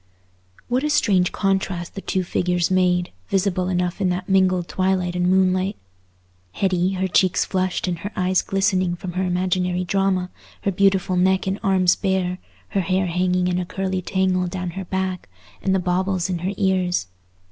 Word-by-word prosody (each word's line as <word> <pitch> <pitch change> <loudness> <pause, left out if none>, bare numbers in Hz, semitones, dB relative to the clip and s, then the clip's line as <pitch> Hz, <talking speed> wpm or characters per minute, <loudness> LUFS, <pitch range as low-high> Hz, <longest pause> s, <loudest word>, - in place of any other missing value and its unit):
What 250 +3 0
a 300 - 0
strange 200 -12 +3
contrast 190 -3 -1
the 195 - -6
two 190 -1 -1
figures 180 0 0
made, 180 -1 +2 0.2
visible 185 -1 0
enough 180 +1 -1
in 185 - +2
that 180 +1 -2
mingled 185 -2 +2
twilight 185 -1 0
and 180 0 +1
moonlight! 185 +1 +2 0.8
Hetty, 185 - +1
her 190 0 -1
cheeks 185 0 +2
flushed 185 -1 -1
and 175 -2 -2
her 205 +5 -5
eyes 185 -2 +2
glistening 190 -2 +1
from 175 +1 -6
her 185 +2 -1
imaginary 180 0 0
drama, 185 0 0 0.3
her 200 - +1
beautiful 190 -1 +2
neck 190 +1 +2
and 190 +2 -2
arms 190 -3 +3
bare, 190 -2 -1 0.3
her 195 - 0
hair 185 +1 0
hanging 180 +1 +1
in 180 0 0
a - - -1
curly 190 -1 -2
tangle 185 0 0
down 180 0 -4
her 190 +2 -6
back, 185 - -3 0.3
and 190 0 +1
the - - +2
baubles 185 0 0
in 175 - -2
her 185 +4 -2
ears. 185 - +1
185 Hz, 170 wpm, -22 LUFS, 180-190 Hz, 0.8 s, strange